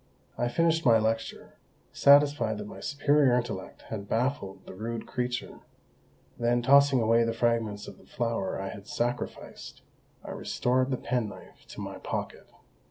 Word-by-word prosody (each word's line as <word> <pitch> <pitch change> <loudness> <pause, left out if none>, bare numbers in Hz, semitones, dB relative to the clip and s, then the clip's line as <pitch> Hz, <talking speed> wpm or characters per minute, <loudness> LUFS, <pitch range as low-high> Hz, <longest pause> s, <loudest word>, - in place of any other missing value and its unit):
I 120 - 0
finished 165 +5 +2
my 115 -3 +6
lecture, 110 +1 -3 0.3
satisfied 140 -6 +5
that 105 - -6
my 105 - -9
superior 145 -3 +3
intellect 120 -6 -4
had 100 -2 -6
baffled 115 -5 -2
the - - -9
rude 115 +3 -5
creature; 125 -1 -4 0.8
then, 120 0 +1
tossingaway 130 -4 +5
the 115 0 0
fragments 115 -3 0
of - - -11
the - - -20
flower 115 -6 -2
I 95 0 -4
had 100 0 -10
sacrificed, 120 +1 -4 0.4
I - - -7
restored 130 +1 0
the 130 - 0
penknife 115 -7 -4
to - - -9
my - - -6
pocket. - - -5
120 Hz, 145 wpm, -28 LUFS, 110-130 Hz, 0.8 s, my